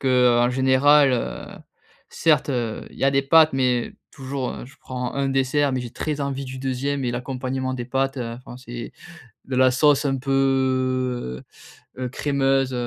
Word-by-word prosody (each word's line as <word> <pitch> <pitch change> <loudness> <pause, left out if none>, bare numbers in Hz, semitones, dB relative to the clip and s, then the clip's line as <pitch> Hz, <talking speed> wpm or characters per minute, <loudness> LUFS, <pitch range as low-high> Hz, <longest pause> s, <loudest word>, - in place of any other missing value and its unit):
qu'en 125 -2 +3
général, 130 +2 +4
heu 120 - -3 0.6
certes, 155 -3 +2
heu, 120 -4 -3
il - - -15
y - - 0
a 135 - +4
des 135 0 +2
pâtes. 155 +2 +5
Mais, 125 -2 0 0.2
toujours 135 -2 -5
je 135 - -16
prends 125 -1 -5
un 140 0 0
dessert 135 +2 +1
mais 130 - -1
j'ai 120 -1 -7
très 150 +2 -4
envie 140 -1 -3
du 130 0 -7
2e 135 +1 -2
et 120 - -1
l'accompagnement 130 +1 -3
des 120 -1 -4
pâtes, 135 +2 -1
heu, 120 -3 -4
enfin 125 -1 -11
c'est 120 -2 -8 0.6
de 130 - -4
la 130 0 +5
sauce 145 +2 +3
un 135 -1 +1
peu, 130 - 0 0.6
heu, 130 -1 -3
crémeuse. 135 0 0
130 Hz, 170 wpm, -23 LUFS, 125-135 Hz, 0.6 s, pâtes